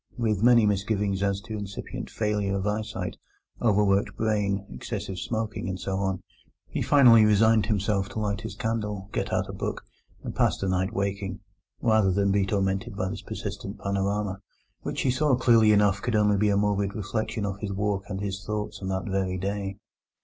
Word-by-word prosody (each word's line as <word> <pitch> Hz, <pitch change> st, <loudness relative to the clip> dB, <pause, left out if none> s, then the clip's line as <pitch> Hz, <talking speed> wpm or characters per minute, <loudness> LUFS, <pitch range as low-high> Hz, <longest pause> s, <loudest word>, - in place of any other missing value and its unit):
With 110 Hz, -5 st, 0 dB
many 120 Hz, -1 st, +6 dB
misgivings 100 Hz, -1 st, 0 dB
as 100 Hz, 0 st, 0 dB
to 110 Hz, +1 st, -6 dB
incipient 100 Hz, -2 st, -6 dB
failure 105 Hz, -2 st, -1 dB
of 95 Hz, -, -3 dB
eyesight, 105 Hz, -3 st, -3 dB, 0.4 s
overworked 100 Hz, -3 st, +2 dB
brain, 100 Hz, -3 st, 0 dB
excessive 90 Hz, +8 st, -5 dB
smoking, 110 Hz, -4 st, -3 dB
and 95 Hz, 0 st, -4 dB
so 95 Hz, -1 st, -2 dB
on, 95 Hz, -1 st, -1 dB, 0.4 s
he -, -, -3 dB
finally 120 Hz, -6 st, +7 dB
resigned 105 Hz, 0 st, +4 dB
himself 100 Hz, -2 st, 0 dB
to -, -, -5 dB
light 105 Hz, -1 st, -1 dB
his 110 Hz, -, -6 dB
candle, 105 Hz, -4 st, -3 dB
get -, -, -2 dB
out -, -, 0 dB
a -, -, -7 dB
book, -, -, -4 dB, 0.4 s
and -, -, -5 dB
pass -, -, +2 dB
the 95 Hz, -, -2 dB
night 95 Hz, +2 st, 0 dB
waking, 100 Hz, -2 st, -3 dB, 0.4 s
rather 110 Hz, -4 st, +3 dB
than 100 Hz, +1 st, +2 dB
be 100 Hz, -1 st, +2 dB
tormented 100 Hz, +2 st, -1 dB
by 95 Hz, -2 st, -1 dB
this 105 Hz, +1 st, -5 dB
persistent -, -, -6 dB
panorama, 100 Hz, 0 st, -1 dB, 0.4 s
which -, -, -3 dB
he 130 Hz, -, +2 dB
saw 135 Hz, +1 st, +3 dB
clearly 115 Hz, -3 st, +5 dB
enough 100 Hz, -1 st, +3 dB
could 120 Hz, -2 st, -1 dB
only 105 Hz, -1 st, +4 dB
be 105 Hz, +1 st, +3 dB
a 100 Hz, -, +3 dB
morbid 100 Hz, -1 st, +1 dB
reflection 110 Hz, +1 st, -2 dB
of 100 Hz, -1 st, -4 dB
his 105 Hz, -2 st, -4 dB
walk 100 Hz, 0 st, -1 dB
and 95 Hz, 0 st, -4 dB
his 100 Hz, 0 st, -4 dB
thoughts 105 Hz, -1 st, -4 dB
on 95 Hz, -, -4 dB
that 95 Hz, 0 st, -2 dB
very 95 Hz, -2 st, -1 dB
day. 100 Hz, +1 st, -3 dB
100 Hz, 185 wpm, -27 LUFS, 95-110 Hz, 0.4 s, finally